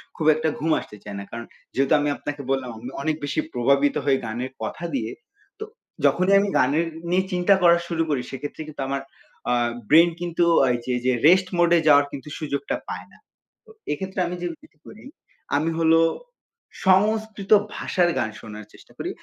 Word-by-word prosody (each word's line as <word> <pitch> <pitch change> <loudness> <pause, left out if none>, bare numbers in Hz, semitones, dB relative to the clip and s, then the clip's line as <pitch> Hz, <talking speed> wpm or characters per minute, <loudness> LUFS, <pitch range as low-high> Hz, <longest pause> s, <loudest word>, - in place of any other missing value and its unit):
খুব 160 - -3
একটা 160 +1 0
ঘুম 160 +2 0
আসতে 105 - -11
চায় 100 - -7
না। - - -6
কারণ 120 0 -6 0.3
যেহেতু 135 +3 +2
আমি 145 0 0
আপনাকে 145 -1 -5
বললাম 135 -2 -1
আমি 120 +3 -7
অনেক 155 +2 0
বেশি 145 - -2
প্রভাবিত 140 +4 +2
হয়ে 135 -2 +3
গানের 120 +4 -4
কথা 170 - -5
দিয়ে 115 -3 -2 0.5
তো - - -4 0.4
যখনই 185 +2 +3
আমি 200 0 0
গানের 150 +6 +2 0.2
নিয়ে 185 +2 +2
চিন্তা 180 +2 +3
করা 170 -1 +6
শুরু 165 -1 0
করি 140 -4 0
সেক্ষেত্রে 145 +3 -6
কিন্তু 150 -2 -7
আমার 135 0 -2 0.5
আ - - +3 0.4
ব্রেইন 165 +3 +7
কিন্তু 175 0 0 0.2
আ - - +1
এই 120 - -2
যে 125 - -1
যে 130 - +4 0.2
রেস্ট 185 +2 +5
মোড 175 0 +4
এ - - +3
যাওয়ার 145 -1 +6
কিন্তু 140 +2 -8
সুযোগটা 140 -3 -3
পায় - - -6
না। - - -19 0.5
তো - - -21 0.2
এক্ষেত্রে 190 +5 -4
আমি 175 - -4
যেটি 165 -2 -8
করি 220 - -13 0.5
আমি 155 +3 0
হলো 165 0 +4 0.9
সংস্কৃত 210 +1 +2 0.2
ভাষার 175 -2 +1
গান 110 - -1
শোনার 105 -1 -9
চেষ্টা - - -18
করি। - - -4
155 Hz, 185 wpm, -23 LUFS, 135-175 Hz, 0.9 s, ব্রেইন